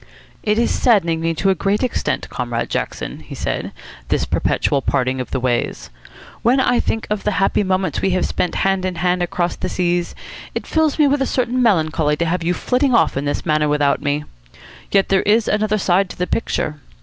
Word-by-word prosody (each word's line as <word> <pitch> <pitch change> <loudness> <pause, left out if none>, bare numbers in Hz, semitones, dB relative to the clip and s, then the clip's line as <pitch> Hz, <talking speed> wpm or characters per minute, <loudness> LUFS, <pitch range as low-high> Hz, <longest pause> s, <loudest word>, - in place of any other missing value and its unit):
"It 210 0 +1
is 235 - +2
saddening 170 -9 +2
me 165 0 0
to 195 +4 +2
a - - +4
great 195 +5 0
extent, 255 - -1
Comrade - - -3
Jackson," - - -3
he - - -10
said, - - -3 0.4
"this - - 0
perpetual 140 -2 0
parting 130 0 0
of 125 - -6
the - - -2
ways. 125 -1 -2 0.5
When 245 +4 +3
I 245 -2 +3
think 225 - -1
of 210 -1 -1
the 210 - 0
happy 195 +1 +2
moments 185 0 0
we - - +2
have 185 0 +1
spent 180 - -2
hand 195 -1 +1
in 185 -1 -2
hand 180 +1 0
across 175 0 -1
the 185 - -4
seas, 175 -1 -1 0.4
it - - -3
fills 315 -2 +1
me 300 -2 +5
with 280 0 +1
a 270 - +1
certain 250 0 0
melancholy 160 -8 +2
to 170 - 0
have 170 +1 -1
you 175 +2 0
flitting 250 - +1
off - - +3
in 135 +2 -2
this 145 0 -2
manner 155 -2 +2
without 145 -1 +2
me. 145 0 -1 0.7
Yet 195 -1 +3
there 195 -1 +3
is 215 +2 +2
another 215 0 +1
side 190 0 +2
to - - -9
the 180 - 0
picture. 155 -7 -2
185 Hz, 210 wpm, -19 LUFS, 160-215 Hz, 0.7 s, me